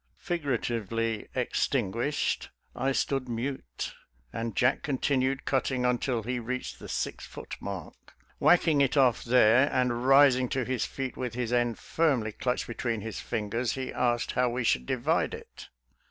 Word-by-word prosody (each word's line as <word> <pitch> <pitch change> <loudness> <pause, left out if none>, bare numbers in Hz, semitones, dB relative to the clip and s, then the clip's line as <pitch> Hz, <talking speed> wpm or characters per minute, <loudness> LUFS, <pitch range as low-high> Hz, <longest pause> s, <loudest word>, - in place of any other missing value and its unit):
" - - -42
Figuratively 115 - -2
extin 125 -3 0
guished, 140 +7 -1 0.3
I 135 +1 0
stood 135 -1 -1
mute, 115 - -4 0.4
and 115 -1 -3
Jack 130 0 +2
continued 135 -1 0
cut 135 -2 +1
ting 130 -2 -1
until 125 -1 0
he 125 +2 -2
reached 130 +2 -4
the - - -9
six - - -3
foot - - -8
mark. 95 -5 -8 0.2
Whack 175 0 +5
ing 150 -3 +4
it 135 +1 +2
off 130 -4 +4
there 125 +3 +5
and 125 -1 0
rising 135 -2 +6
to 130 -2 -1
his 130 0 -1
feet 135 -2 -5
with 125 -3 -4
his 120 -1 -2
end 120 -2 +1
firmly 135 -10 0
clutched 125 +4 -2
between 115 -2 -3
his 110 0 -5
fingers, 115 +2 -2
he 130 -1 -4
asked 120 -1 0
how 125 0 +2
we 120 +1 -2
should 65 - +1
divide - - 0
it. - - -12
125 Hz, 165 wpm, -28 LUFS, 115-130 Hz, 0.4 s, rising